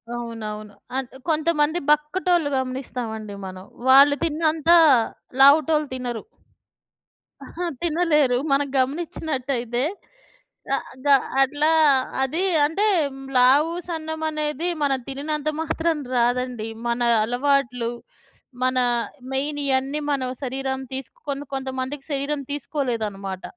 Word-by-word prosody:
అవునవును. 215 Hz, -3 st, -6 dB, 0.2 s
అంటే 265 Hz, 0 st, -5 dB
కొంతమంది 315 Hz, +1 st, +2 dB
బక్కటోళ్ళు 310 Hz, +2 st, +2 dB
గమనిస్తావండి 245 Hz, -5 st, -4 dB
మనం. 185 Hz, 0 st, -8 dB, 0.2 s
వాళ్ళు 280 Hz, +2 st, +8 dB
తిన్నంత, 320 Hz, 0 st, 0 dB, 0.7 s
లావుటోళ్ళు 305 Hz, +2 st, +6 dB
తినరు. 245 Hz, -3 st, -4 dB, 1.2 s
అహ! 355 Hz, +1 st, -5 dB, 0.2 s
తినలేరు. 305 Hz, -6 st, +2 dB
మనం 280 Hz, +1 st, +2 dB
గమనిచ్చినట్టయితే, 260 Hz, -4 st, -1 dB, 0.9 s
అ -, -, 0 dB, 0.3 s
గ -, -, 0 dB, 0.4 s
అట్లా 295 Hz, +4 st, +1 dB, 0.5 s
అది 320 Hz, +8 st, -1 dB, 0.2 s
అంటే, 395 Hz, +8 st, +1 dB, 0.5 s
లావు, 280 Hz, +6 st, +5 dB, 0.2 s
సన్నమనేది 315 Hz, -1 st, -3 dB, 0.2 s
మనం 270 Hz, -2 st, +1 dB
తినినంత 295 Hz, +2 st, -3 dB
మాత్రం 320 Hz, 0 st, -1 dB, 0.2 s
రాదండి. 245 Hz, -1 st, 0 dB, 0.2 s
మన 235 Hz, +1 st, 0 dB, 0.2 s
అలవాట్లు, 250 Hz, -1 st, 0 dB, 0.7 s
మన 255 Hz, 0 st, +1 dB, 0.6 s
మెయిన్ 290 Hz, +2 st, -1 dB
ఇయన్నీ 270 Hz, +2 st, 0 dB
మన 275 Hz, -2 st, 0 dB, 0.2 s
శరీరం 265 Hz, +1 st, -2 dB, 0.2 s
తీసుకొని 285 Hz, -, -6 dB
కొంతమందికి 265 Hz, +1 st, -4 dB
శరీరం 280 Hz, +1 st, -2 dB
తీసుకోలేదనమాట. 215 Hz, -10 st, -3 dB
275 Hz, 90 wpm, -23 LUFS, 250-305 Hz, 1.2 s, వాళ్ళు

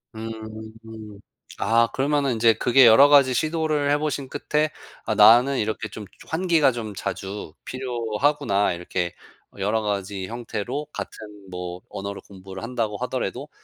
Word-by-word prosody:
음. 110 Hz, +1 st, -6 dB, 1.3 s
아 115 Hz, +3 st, +3 dB
그러면은 140 Hz, -2 st, +1 dB
이제 115 Hz, 0 st, +4 dB
그게 125 Hz, +3 st, +5 dB
여러 115 Hz, +6 st, +8 dB
가지 140 Hz, -3 st, +6 dB
시도를 155 Hz, -1 st, 0 dB
해 145 Hz, -, +4 dB
보신 145 Hz, -2 st, -3 dB
끝에 150 Hz, +1 st, 0 dB, 0.4 s
'아 110 Hz, -, -1 dB
나는 120 Hz, +6 st, +6 dB
이렇게 110 Hz, 0 st, -2 dB
좀 105 Hz, -, -8 dB, 0.2 s
환기가 160 Hz, -5 st, +2 dB
좀 110 Hz, -3 st, -6 dB
자주 95 Hz, -6 st, -5 dB
필요하구나.' 120 Hz, -4 st, 0 dB
이렇게 90 Hz, 0 st, -3 dB, 0.5 s
여러 105 Hz, +3 st, 0 dB
가지 100 Hz, -2 st, -3 dB
형태로 120 Hz, +5 st, -4 dB
같은 105 Hz, -3 st, -9 dB
뭐 90 Hz, 0 st, -6 dB
언어를 100 Hz, 0 st, -6 dB
공부를 95 Hz, +1 st, -10 dB
한다고 115 Hz, -4 st, -2 dB
하더라도 -, -, -4 dB
115 Hz, 290 characters per minute, -24 LUFS, 100-140 Hz, 1.3 s, 여러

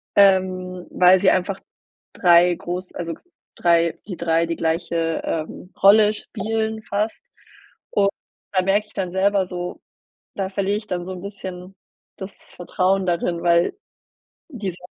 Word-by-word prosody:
ähm, 185 Hz, -2 st, +3 dB
weil 180 Hz, +1 st, +5 dB
sie 195 Hz, -, +5 dB
einfach 185 Hz, +1 st, 0 dB, 0.5 s
3 175 Hz, -3 st, +5 dB
groß 180 Hz, +2 st, -6 dB
also, 170 Hz, -1 st, -4 dB, 0.4 s
3 170 Hz, -1 st, +2 dB
die 185 Hz, -4 st, -6 dB
3 165 Hz, 0 st, +1 dB
die 165 Hz, -, -2 dB
gleiche, 165 Hz, 0 st, -1 dB
ähm, 165 Hz, +3 st, -5 dB
Rolle 210 Hz, +1 st, +6 dB
spielen 220 Hz, +1 st, -3 dB
fast 215 Hz, -, -2 dB, 0.7 s
und 200 Hz, -1 st, +3 dB, 0.4 s
da 190 Hz, -2 st, +2 dB
merke 205 Hz, +3 st, +1 dB
ich -, -, -22 dB
dann 185 Hz, -2 st, -3 dB
selber 195 Hz, 0 st, +2 dB
so 180 Hz, -1 st, -6 dB, 0.6 s
da 195 Hz, -1 st, -2 dB
verliere 200 Hz, +1 st, 0 dB
ich 210 Hz, -, -12 dB
dann 175 Hz, -1 st, -3 dB
so 190 Hz, -, -5 dB
'n 185 Hz, -, -7 dB
bisschen 190 Hz, -2 st, -8 dB, 0.4 s
das 190 Hz, +1 st, -7 dB, 0.2 s
Vertrauen 185 Hz, +2 st, 0 dB
darin, 170 Hz, -1 st, -1 dB
weil 170 Hz, -, +2 dB, 0.7 s
die 215 Hz, -, -4 dB
sa 180 Hz, +1 st, -14 dB
185 Hz, 145 wpm, -22 LUFS, 175-200 Hz, 0.7 s, Rolle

